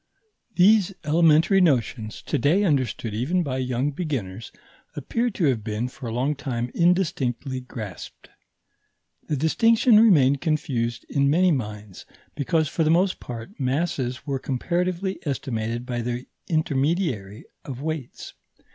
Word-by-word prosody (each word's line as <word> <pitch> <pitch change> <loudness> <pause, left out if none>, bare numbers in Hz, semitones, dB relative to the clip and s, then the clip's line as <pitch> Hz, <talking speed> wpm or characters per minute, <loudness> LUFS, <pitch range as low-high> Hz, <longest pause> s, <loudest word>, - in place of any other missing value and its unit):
These 195 0 +4
elementary 165 +4 +4
notions, 120 - 0
to - - -1
day 160 - +3
understood 130 - 0
even 150 +12 0
by 130 -4 -3
young 130 +2 -1
beginners, 120 - -4 0.4
appear 230 - -1
to 195 -6 -1
have 125 -7 +1
been 110 +3 -2
for 125 - -9
a - - -4
long 130 +6 0
time 120 -3 -3
indistinctly 145 -7 0
grasped. 110 -6 -9 1.0
The 150 - -1
distinction 225 - +4
remained 140 - +5
confused 135 -7 -1
in 140 -1 +1
many 180 +4 +4
minds, 105 - -5 0.3
because, 155 +2 0
for 165 +2 -1
the 155 - +2
most 180 +3 +2
part, 120 - -9
masses 130 -2 -1
were 140 -3 -2
comparatively 180 +8 -2
estimated 120 -5 -3
by 120 -1 -3
the 120 +2 -4 0.2
intermediary 145 - -1 0.2
of 135 0 -7
weights. 155 -5 -5
140 Hz, 130 wpm, -24 LUFS, 120-170 Hz, 1.0 s, remained